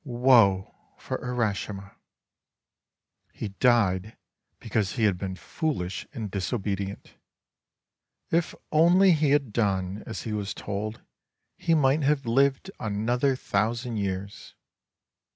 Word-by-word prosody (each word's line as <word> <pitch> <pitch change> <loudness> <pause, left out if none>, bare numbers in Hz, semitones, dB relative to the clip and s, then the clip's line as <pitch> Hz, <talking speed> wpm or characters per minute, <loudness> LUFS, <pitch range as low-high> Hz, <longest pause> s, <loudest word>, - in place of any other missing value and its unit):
Woe 120 -7 +4 0.2
for - - -4
Urashima! 105 -5 -3 1.4
He 110 - -5
died 105 -2 +2 0.4
because 110 -3 -1
he 115 - -1
had 105 -3 +4
been 95 -1 -4
foolish 105 - -3
and 110 -4 -5
disobedient. 100 -1 -3 1.2
If 170 0 +1 0.2
only 175 +5 +6
he 155 -3 +3
had 140 -6 +1
done 100 -2 0
as 110 - -5
he 110 - -4
was 105 -1 -3
told, 105 +2 -4 0.5
he 165 - +1
might 145 0 +3
have 140 -1 +1
lived 135 +8 +2
another 120 +6 0
thousand 115 +1 -1
years. 100 0 -4
110 Hz, 110 wpm, -26 LUFS, 100-135 Hz, 1.4 s, only